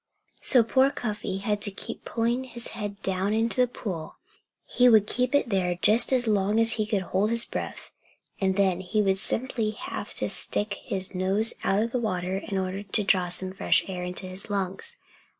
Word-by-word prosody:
So 250 -4 +6
poor 260 +4 +3
Cuffy 210 -6 -4
had 205 +1 -2
to 205 - +4
keep 195 - -8
pulling 235 +3 -1
his 240 -2 -5
head 205 -1 -6
down 190 +2 -1
into 230 +3 +3
the 250 - +4
pool. 180 -9 -6 0.5
He 250 0 +4
would 215 -3 +6
keep 250 +5 0
it 285 - +2
there 180 -3 0
just 220 +7 +4
as 255 -2 +3
long 210 0 +1
as 230 0 +3
he 215 -2 -1
could 200 -3 0
hold 195 +4 0
his 230 0 0
breath; - - -6 0.5
and 190 -1 +1
then 190 -3 +2
he 190 +4 -2
would 195 -2 +2
simply 230 0 0
have 215 - -7
to - - -2
stick 205 0 0
his 190 0 -4
nose 195 +5 +2
out 200 +2 +2
of 230 - -3
the 250 - -1
water 185 -4 -2
in 195 -1 -4
order 190 +1 -2
to 205 +1 -1
draw 185 -2 +2
some 185 +1 -2
fresh 190 - +2
air 180 -2 -5
into 180 +1 -3
his 185 +3 -4
lungs. 200 - -2
205 Hz, 200 wpm, -26 LUFS, 190-230 Hz, 0.5 s, So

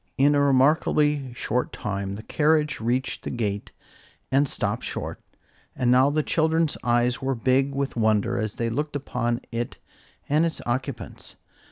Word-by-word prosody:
In 145 +2 +5
a 145 - +3
remarkably 140 0 +3
short 125 +1 -1
time 100 -1 -4
the 110 - -8
carriage 150 +1 +1
reached 120 +4 -1
the - - -4
gate 105 -4 -3 0.6
and 135 +1 +3
stopped - - -2
short, - - -4 0.5
and 125 -1 +2
now 130 +2 +5
the 155 +1 +1
children's 160 0 +1
eyes 120 0 +2
were 135 0 0
big 130 +3 +2
with 140 0 -2
wonder 110 -3 +2
as 110 -1 -2
they 115 -1 -1
looked 150 +5 -2
upon 120 -4 -2
it 115 0 -3 0.5
and 150 +3 +3
its 165 -1 -1
occupants. 130 +2 -4
130 Hz, 155 wpm, -25 LUFS, 120-145 Hz, 0.6 s, In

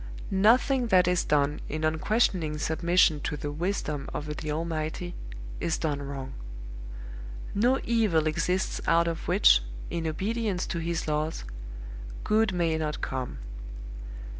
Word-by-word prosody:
Nothing 240 +6 +4
that 185 -4 +5
is 180 -1 +3
done 145 0 +2
in 155 +1 -3
unquestioning 160 -1 +2
submission 160 0 +3
to 150 - -3
the 145 +1 -4
wisdom 150 -3 -2
of 150 0 -4
the 155 - -3
Almighty 160 +2 -2 0.5
is 165 - 0
done 145 -3 -1
wrong. 140 -1 -5 1.2
No 245 +6 +3
evil 215 -9 +2
exists 175 +4 0
out 170 0 +4
of 165 -1 -3
which, - - +6 0.3
in 165 -1 -1
obedience 200 +3 -1
to 170 - -3
his 165 0 -2
laws, 155 +1 -1 0.8
Good 220 -1 +3
may 165 -3 +1
not 155 -1 -2
come. 130 -2 -3
165 Hz, 130 wpm, -28 LUFS, 150-185 Hz, 1.2 s, which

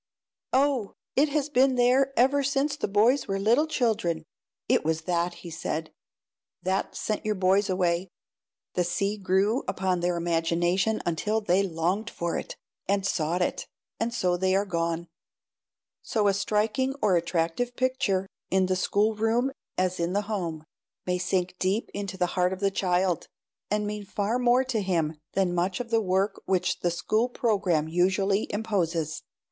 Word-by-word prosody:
"Oh, 265 -5 +2 0.2
it 290 +3 +4
has 290 -1 0
been 265 -2 +3
there 255 +2 +4
ever 270 +4 +4
since 280 +1 0
the 300 - -2
boys 220 +7 +3
were 195 - -1
little 235 +10 +3
children." 220 - 0 0.4
"It - - +3
was 160 0 0
that," 175 +1 -1
he 170 - -6
said, 160 -1 -3 0.7
"that 190 +2 -1
sent 215 - -2
your 215 0 0
boys 195 +2 +2
away. 180 0 0 0.6
The 180 - +1
sea 190 +4 -1
grew 200 +5 +1
upon 185 -1 0
their 175 0 0
imagination 175 +5 +1
until 210 +6 0
they 195 -3 +2
longed 185 +4 -1
for 170 -5 -3
it, - - -5 0.3
and 200 0 +1
sought 170 +1 0
it, - - -3 0.3
and 230 +1 0
so 180 -6 +1
they 185 +1 +2
are 200 +1 +2
gone." 170 -2 -2 0.9
So 210 -3 0
a 200 - +4
striking 220 +7 0
or 205 -7 +3
attractive 170 +8 -1
picture, 245 -7 0 0.2
in 190 0 +3
the 185 0 +1
schoolroom 220 +6 +1 0.3
as 185 -1 0
in 170 +1 0
the 205 - +2
home, 175 -7 -3 0.4
may 180 0 0
sink 180 0 0
deep 195 +5 0
into 200 -2 -4
the 180 - +2
heart 180 0 +2
of 190 - -6
the 200 0 +1
child, 180 -2 0 0.4
and 210 0 0
mean 210 0 -4
far 210 +4 -1
more 250 +1 +4
to 250 -5 -1
him 165 -5 -1
than 190 -2 +1
much 180 +2 0
of 240 -1 -5
the 225 -1 +3
work 195 +1 0
which 185 -1 +1
the 175 - +1
school 215 +8 0
program 195 -10 +1
usually 190 +4 +1
imposes. 175 -7 -1
195 Hz, 165 wpm, -27 LUFS, 175-220 Hz, 0.9 s, it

